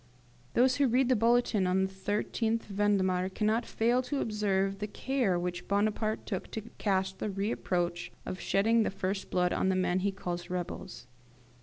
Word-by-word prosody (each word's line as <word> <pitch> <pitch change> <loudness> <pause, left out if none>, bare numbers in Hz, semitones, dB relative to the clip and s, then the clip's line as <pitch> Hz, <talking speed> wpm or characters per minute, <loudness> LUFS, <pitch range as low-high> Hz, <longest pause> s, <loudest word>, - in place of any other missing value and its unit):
Those 255 +1 +4
who 280 -1 +4
read 250 +2 +3
the 255 - +5
bulletin 230 -3 +3
of 180 +1 +2
the 190 +1 -2
13th 225 +2 0
Vendemiaire, 195 -2 +1
cannot 215 +4 0
fail 240 +3 +2
to 260 +2 -3
observe 195 -2 0
the 210 - -2
care 235 -4 0
which 175 0 -3
Bonaparte 215 +2 0
took 190 -4 -4
to 220 - -3 0.2
cast 190 -2 0
the - - -2
reproach 185 -3 -1
of 185 - -5
shedding 225 +4 +3
the - - +1
first 195 0 -3
blood 180 -1 +1
on 190 - +1
the 190 - +2
men 185 0 +1
he 200 +2 0
calls 175 -2 -5
rebels. 180 -8 -5
200 Hz, 170 wpm, -30 LUFS, 185-225 Hz, 0.2 s, the